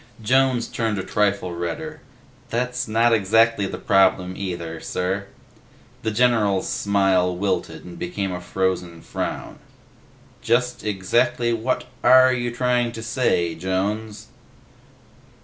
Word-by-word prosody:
Jones 130 0 +2
turned 110 -3 -2
a 95 - -2
trifle 100 -2 0
redder. 155 - -5 0.5
"That's 125 +1 -2
not 115 +2 +3
exactly 110 0 +3
the - - -5
problem, 95 -2 +2
either, 85 -4 -5
sir." 95 +4 -3 0.7
The 110 - -1
general's 110 -4 +2
smile 95 -3 +1
wilted 95 0 -2
and 90 -1 -10
became 95 +2 -3
a 90 0 -5
frozen 90 -3 -2
frown. - - -5 0.8
"Just 125 +1 0
exactly 120 +4 +1
what 115 +3 -1 0.2
are 130 0 +7
you 120 -1 -1
trying 120 0 0
to 115 - -7
say, 110 -8 +1
Jones?" 100 +6 -3
105 Hz, 115 wpm, -22 LUFS, 95-120 Hz, 0.8 s, are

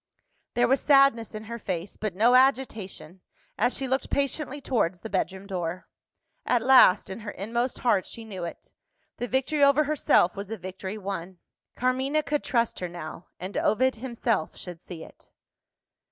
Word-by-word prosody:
There 245 0 +3
was 270 +3 +2
sadness 275 -6 +4
in 215 - -6
her 235 +2 -7
face, 185 -2 -4
but 210 -4 -4
no 230 +5 +4
agitation, 230 - +1 0.3
as 245 +5 +1
she 270 - -3
looked 265 +1 -1
patiently 280 0 -1
towards 205 -10 -1
the 220 - -8
bedroom 190 0 -2
door. 180 -2 -4 0.6
At 245 -2 +1
last 250 -8 +6
in 190 - -6
her 215 -2 -7
inmost 235 +6 -2
heart, 205 -6 +1
she 230 - -8
knew 190 -5 -6
it 170 - -8 0.5
the 245 - -3
victory 270 +4 +1
over 280 +2 +5
herself 285 - +2
was 200 0 -6
a 225 - -4
victory 190 +2 -6
won. 190 -3 -5 0.4
Carmina 265 +4 +1
could 295 0 -1
trust 235 -3 0
her 180 - -4
now; 170 0 -8
and 185 +3 -6
Ovid 260 +4 +2
himself 235 -7 -2
should 175 -2 -9
see 165 -3 -9
it! - - -16
225 Hz, 170 wpm, -26 LUFS, 190-260 Hz, 0.6 s, last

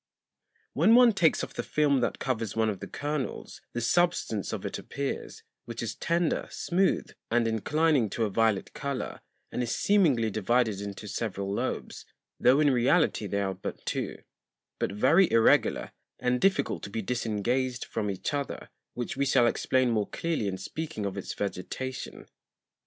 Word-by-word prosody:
When 190 - +5
one 245 -2 +7
takes 170 -5 +3
off - - -6
the - - -2
Film 145 -3 +2
that 120 - -1
covers 115 -5 -2
one 110 -1 +2
of 100 - -7
the - - -7
Kernels, 145 -2 -4
the 120 - -2
Substance 120 - +1
of - - -4
it - - -3
appears; 140 -1 -5 0.2
which 115 0 -5
is 110 -2 -3
tender, 170 +4 0
smooth, 185 +2 0 0.2
and 115 0 +2
inclining 140 +2 +2
to 115 - -1
a 105 - -3
violet 110 -1 +1
Colour, 140 -2 -4 0.3
and - - -2
is 120 - -1
seemingly 145 - +3
divided 110 0 +1
into 100 +1 -6
several 100 -2 -3
Lobes, - - -3 0.4
tho' 130 +3 +5
in 145 -2 +4
reality 130 -2 +2
they 100 +1 -1
are 95 -1 -1
but - - -7
two; - - -2 0.6
but - - 0
very 165 - +4
irregular, 115 0 +3 0.3
and 125 0 0
difficult 195 0 +2
to - - -7
be 110 +2 -3
disengaged 120 +3 -1
from 105 - -3
each 95 +6 -3
other, 140 -1 -4 0.2
which 120 +1 -3
we 140 +1 +1
shall 120 - +4
explain 130 +1 +2
more 105 -3 0
clearly 165 -11 -2
in 95 -1 -2
speaking 150 - -5
of 100 -1 -3
its 100 - -5
Vegetation. 105 +6 -5
120 Hz, 165 wpm, -28 LUFS, 105-145 Hz, 0.6 s, one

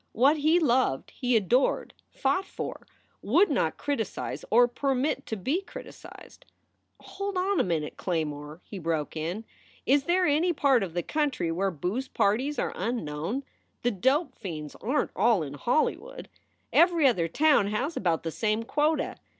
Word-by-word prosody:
What 275 +7 +4
he 310 +3 +3
loved 255 - +1
he 250 -1 0
adored, 235 +6 +1 0.2
fought 280 +8 0
for, - - -7 0.3
would 335 - +3
not - - 0
criticize 275 -8 -3
or 240 +2 +6
permit 270 +2 -1
to 220 - -3
be 275 - -1
criticized. - - -12 0.6
"Hold 395 -1 -5
on 380 +1 +1
a - - +4
minute, 160 -4 -2
Claymore," 155 -2 -3
he 200 - -8
broke 160 -3 -2
in. 170 +8 -4 0.4
"Is 275 +1 +3
there 360 +1 +2
any 320 +4 +2
part 275 -5 +3
of 180 -4 -4
the 175 - 0
country 275 - -1
where 195 +4 0
booze 185 - -3
parties 260 +10 0
are - - -1
unknown? 195 - -3 0.4
The 245 - +2
dope 265 - +1
fiends 155 -6 -6
aren 265 +7 0
t - - -34
all 210 -3 +3
in 140 -2 -6
Hollywood. 245 - -1 0.4
Every 340 -3 +5
other 185 -11 +3
town 285 - +3
has 250 +10 -2
about 170 -4 0
the 165 - -3
same 215 +4 0
quota. 300 +6 0
240 Hz, 160 wpm, -27 LUFS, 175-290 Hz, 0.6 s, or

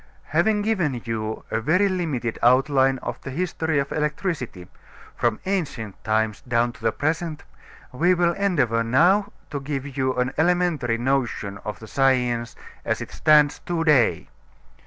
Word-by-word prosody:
Having 210 -1 +2
given 180 - 0
you 110 -1 -3
a 115 - 0
very 180 - +3
limited 155 - -2
outline 135 +2 +4
of - - -5
the - - -7
history 160 0 -1
of 140 0 -1
electricity, 150 - -3 0.5
from 120 -2 0
ancient 140 - -3
times 110 -1 0
down 120 -1 0
to - - -18
the 110 0 +1
present, 155 +3 -2 0.5
we 175 +8 +2
will 175 -1 +2
endeavor 145 - +1
now 180 - +3 0.2
to 145 - -3
give 140 -1 -5
you 130 -1 0
an 125 +1 -1
elementary 165 -8 +1
notion 120 -6 -1
of 105 -1 -6
the 110 - -11
science 125 -3 +1 0.3
as - - -1
it - - -7
stands 150 -2 +4
to 170 -2 -2
day. 130 - +3
135 Hz, 150 wpm, -23 LUFS, 120-165 Hz, 0.5 s, outline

